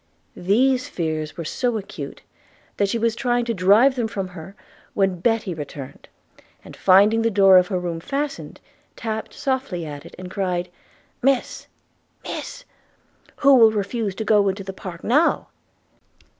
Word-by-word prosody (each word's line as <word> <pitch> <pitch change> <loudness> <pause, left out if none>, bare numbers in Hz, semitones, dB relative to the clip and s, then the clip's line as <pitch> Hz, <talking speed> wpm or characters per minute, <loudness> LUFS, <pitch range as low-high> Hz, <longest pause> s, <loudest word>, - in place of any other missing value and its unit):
These 250 +7 +1
fears 155 -2 -3
were 170 - -5
so 240 +7 -1
acute, 200 - -8 0.5
that 200 -1 +1
she 235 - 0
was 230 0 0
trying 245 -1 0
to 235 - -1
drive 205 +8 +5
them 240 -3 -1
from 195 -4 -4
her, 180 +2 -11 0.4
when 195 -3 +1
Betty 225 -1 0
returned, 145 -3 -9 0.6
and, - - -11
finding 205 +4 +5
the 230 - +2
door 195 -3 +6
of 180 - 0
her 185 -2 -1
room 170 -2 -4
fastened, 280 - -4 0.4
tapped 220 -1 -4
softly 260 -11 -2
at 145 -2 -8
it, - - -13
and 180 0 -9
cried, 180 -3 -2 0.5
'Miss, 270 0 0 0.6
miss! - - -7 0.7
who 280 -1 +5
will 225 -2 +7
refuse 210 -1 -2
to 220 - -4
go 205 -2 +4
into 195 +1 -4
the 195 0 -7
park 180 -3 -9
now?' 295 +8 +2
200 Hz, 155 wpm, -22 LUFS, 180-235 Hz, 0.7 s, will